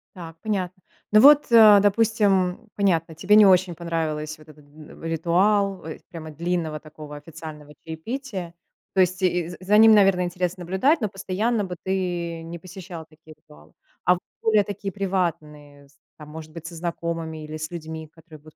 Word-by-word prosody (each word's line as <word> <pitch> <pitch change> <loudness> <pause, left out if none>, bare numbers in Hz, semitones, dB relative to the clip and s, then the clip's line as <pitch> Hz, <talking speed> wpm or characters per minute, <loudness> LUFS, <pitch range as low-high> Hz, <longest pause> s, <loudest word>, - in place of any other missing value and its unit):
Так, 165 -3 -9
понятно. 185 -4 -3 0.3
Ну 215 +1 +6
вот, 290 -2 +7
а, 215 -3 +8
допустим, 205 -2 +1
понятно. 165 -5 0
Тебе 185 +6 +3
не 215 - +8
очень 185 -2 +4
понравилась 155 -2 -3
вот 155 - -18
эта 150 0 -16
н 150 +1 -15
ритуал, 190 +4 +1
ой 160 -1 -8
прямо 165 -3 -9
длинного 165 -1 -3
такого 150 -1 -11
официального 150 0 -10
чаепития. 185 +2 -6 0.4
То 190 - +3
есть 185 +1 0
и 175 -2 +1
за 175 - -9
за 200 +3 +2
ним, 220 0 +8
наверное, 195 -3 +4
интересно 180 0 -3
наблюдать, 190 - +1
но 215 - -1
постоянно 205 +3 -1
бы 180 -2 -5
ты 175 -3 -3
не 170 +1 -8
посещал 180 -2 -10
такие 155 0 -17
ритуалы. 75 - -20 0.3
А 180 - +5
в - - -9 0.2
более 215 -2 +4
такие 200 -1 -5
приватные, 155 -7 -4
з 140 - -28 0.2
там, 150 -1 -11
может 155 0 -10
быть, 165 0 -9
со 170 - -9
знакомыми 165 -1 -4
или 155 +1 -7
с 155 +1 -6
людьми, 160 -2 -7
которые 160 0 -16
будут 155 +1 -18
175 Hz, 175 wpm, -23 LUFS, 160-195 Hz, 0.4 s, а